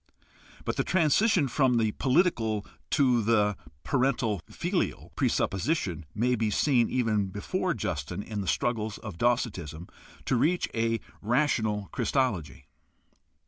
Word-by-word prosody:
But - - -2
the - - +2
transition 180 0 +3
from 130 -1 +2
the 110 -2 +2
political 120 - +1 0.2
to 125 -5 +3
the 105 -2 +2 0.3
parental 125 - +1
filial - - -2
presupposition 95 - 0
may 120 +4 +2
be 110 -2 +1
seen 120 +2 +2
even 110 -5 +1
before 170 - -2
Justin 90 -2 -3
in 105 -2 -4
the 95 - -5
struggles 110 -1 -1
of 100 -6 -9
Docetism 95 - -1 0.4
to 130 - +1
reach 170 +9 +2
a 115 0 0 0.2
rational 110 -4 +1
Christology. 100 - -1
115 Hz, 120 wpm, -28 LUFS, 105-130 Hz, 0.4 s, transition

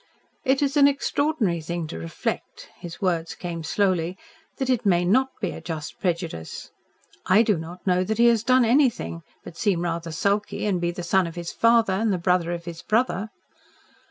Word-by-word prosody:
"It 270 0 +2
is 280 +1 0
an 280 -1 +7
extraordinary 280 - 0
thing 170 +1 -4
to - - -6
reflect," 80 0 -5
his 175 +2 -9
words 170 -3 0
came 170 -2 -5
slowly 185 0 0 0.4
"that 265 - -2
it 255 -3 +1
may 175 -3 +3
NOT 260 +9 +3
be 185 -5 -2
a - - -8
just 155 -3 -6
prejudice. 170 - -3 0.6
I 200 +5 +6
do 210 -3 +2
not 170 +2 -8
know 180 -1 +2
that 220 +2 -2
he 235 - +5
has 235 -2 +4
done 255 0 +4
anything 230 - +2 0.2
but 165 - -11
seem 195 -7 +1
rather 170 -1 -3
sulky, 200 +7 -1
and 190 -4 0
be 170 - +1
the 175 +1 -5
son 185 +1 +2
of 165 - -8
his 170 -1 -5
father, 230 -3 +3
and 215 +3 +1
the 185 - +1
brother 175 -1 +1
of 170 -1 -5
his 170 -2 -7
brother." 220 -2 0
185 Hz, 190 wpm, -24 LUFS, 170-225 Hz, 0.6 s, an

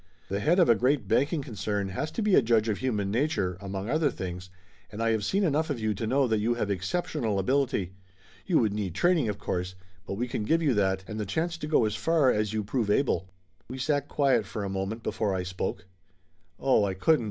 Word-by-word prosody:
"The 100 - -1
head 160 - +2
of 180 - +5
a 115 - +7
great 130 +6 +1
banking 145 +1 +1
concern 105 -4 -3
has 130 +11 -3
to 225 - -2
be 210 -2 +2
a - - +7
judge 115 -2 +2
of 105 -3 -1
human 105 -6 -1
nature, 120 - 0
among 95 0 -4
other 155 +3 +2
things, 90 -5 -6 0.4
and 105 - -8
I 115 0 +2
have 110 -2 0
seen 195 - +1
enough 160 -1 +1
of 140 -5 -2
you 110 -1 0
to 110 +3 -4
know 135 +3 +2
that 110 -2 +1
you 115 +3 +1
have 105 -4 -1
exceptional 110 - -1
ability. 100 -4 0 0.5
You - - +3
would 110 -4 +2
need 100 -5 -3
training, 165 - +2
of 105 - -3
course, 90 0 -3 0.3
but - - -3
we 120 +5 -2
can 120 - -3
give 165 +9 +2
you 145 -5 +3
that, 95 -3 +1
and 110 0 -5
the 105 - -2
chance 165 - -1
to 150 - -4
go 150 -7 +3
as 105 0 -1
far 155 +1 +3
as 105 -1 0
you 110 -1 -1
prove 110 +1 -1
able." 100 -6 +1 0.4
We 130 - -6
sat 145 +1 0
quiet 130 -9 +2
for 105 - -4
a 100 - -3
moment 95 +4 -3
before 105 -3 -1
I 90 - -1
spoke. 90 +1 -4 0.7
"Oh, 130 -6 +3
I 95 -2 -1
couldn't!" 155 +11 +3
110 Hz, 230 wpm, -28 LUFS, 100-140 Hz, 0.7 s, a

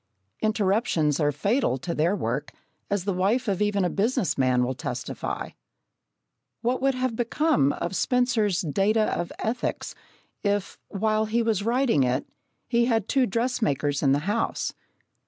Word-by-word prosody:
Interruptions 200 - +1
are 145 -1 +2
fatal 200 - +1
to 170 +6 -4
their 165 +5 +1
work, 125 - -3 0.4
as 200 -2 0
the 200 0 -1
wife 205 +8 +1
of 200 -1 0
even 205 -2 +2
a - - +1
business 210 - 0
man 130 -2 +2
will 125 +1 -1
testify. - - -4 1.1
What 245 +2 0
would 270 0 +2
have 255 -2 -1
become 235 - +2
of - - -4
Spencer's 220 -5 +1
Data 205 +6 +1
of 175 - -3
Ethics 235 +3 -3 0.5
if, 200 -2 -1
while 215 +2 0
he 230 +2 +1
was 220 -3 +1
writing 235 - +2
it, 125 0 +1 0.4
he 235 0 +2
had 225 -4 +1
two 265 -3 +2
dressmakers 195 - 0
in 135 - +3
the 140 - +3
house? 210 +3 -1
205 Hz, 150 wpm, -26 LUFS, 165-235 Hz, 1.1 s, in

